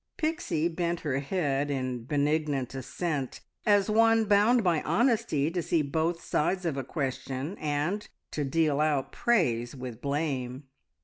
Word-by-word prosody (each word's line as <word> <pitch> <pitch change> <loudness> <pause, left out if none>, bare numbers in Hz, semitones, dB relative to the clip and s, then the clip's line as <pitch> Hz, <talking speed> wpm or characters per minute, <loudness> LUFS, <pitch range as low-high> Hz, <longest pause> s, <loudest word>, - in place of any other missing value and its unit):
Pixie 310 - 0
bent 170 0 -2
her 140 -3 -1
head 145 -2 -1
in 130 -4 -2
benignant 145 -2 0
assent, 135 +1 -3 0.3
as 205 -2 +4
one 225 +1 +4
bound 215 +4 +4
by 170 -4 +2
honesty 170 - +1
to 175 0 -1
see 165 -1 +1
both 160 +4 -1
sides 180 +4 0
of 160 -5 0
a 135 - -2
question 135 +3 -3
and 155 +7 -1 0.2
to 150 - -2
deal 150 0 +1
out 145 -3 +1
praise 120 - +1
with 125 -3 -7
blame. 140 -3 -2
150 Hz, 140 wpm, -28 LUFS, 135-180 Hz, 0.3 s, as